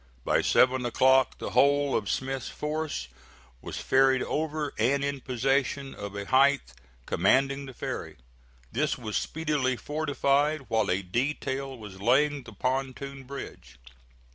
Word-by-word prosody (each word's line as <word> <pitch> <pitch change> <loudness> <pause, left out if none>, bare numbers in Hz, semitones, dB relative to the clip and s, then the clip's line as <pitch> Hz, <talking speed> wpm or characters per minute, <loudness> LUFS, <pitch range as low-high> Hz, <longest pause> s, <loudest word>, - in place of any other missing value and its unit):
By - - +3
seven 130 0 +3
o'clock 130 +2 +3
the - - -5
whole 140 0 +3
of 105 -3 -1
Smith's 135 -1 -2
force 150 - -3 0.5
was - - -6
ferried 130 -1 +3
over 155 -1 -2
and 135 +5 +2
in 140 -1 -2
possession 135 +2 0
of 100 0 -7
a 100 0 -4
height 135 - +3 0.3
commanding 135 +8 +2
the 130 - -9
ferry. - - -5 0.5
This - - 0
was 110 -3 -5
speedily 150 -5 0
fortified, 145 0 0
while 110 -2 +1
a 95 +2 0
detail 135 +5 -2
was 100 -4 -10
laying 140 +6 +3
the 120 -2 -12
pontoon 135 +3 -3
bridge. 135 - -9
135 Hz, 135 wpm, -28 LUFS, 125-140 Hz, 0.5 s, By